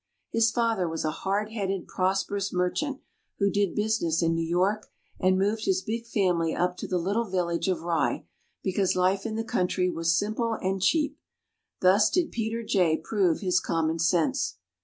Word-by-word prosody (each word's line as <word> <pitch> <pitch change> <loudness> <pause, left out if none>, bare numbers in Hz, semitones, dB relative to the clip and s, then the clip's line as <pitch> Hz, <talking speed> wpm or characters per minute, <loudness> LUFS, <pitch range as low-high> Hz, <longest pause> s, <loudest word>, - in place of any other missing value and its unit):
His 230 0 +3
father 225 -6 0
was 160 0 -3
a 155 - +1
hard 200 +6 -2
headed, 195 -4 -3
prosperous 195 +2 -1
merchant, 260 +11 -1 0.4
who 200 -1 +2
did 200 -2 0
business 210 -6 +1
in 165 0 +2
New 165 0 0
York, 195 +5 +1 0.3
and 185 0 +3
moved 210 +3 0
his 190 0 +1
big 230 +1 -4
family 180 -7 +1
up 180 0 0
to - - -5
the 185 - 0
little 200 +6 -1
village 175 -2 -1
of 180 -4 0
Rye 165 -3 0 0.4
because 190 0 +1
life 190 +3 +1
in 220 - -4
the 225 - -1
country 180 -3 0
was 165 0 +1
simple 225 +3 -1
and 190 0 -1
cheap. 295 - +1 0.6
Thus 190 +3 +5
did 355 -3 0
Peter 230 0 -2
Jay 180 -7 +2
prove 190 -7 0
his 185 -2 +2
commonsense. 165 - 0
190 Hz, 170 wpm, -27 LUFS, 175-215 Hz, 0.6 s, Thus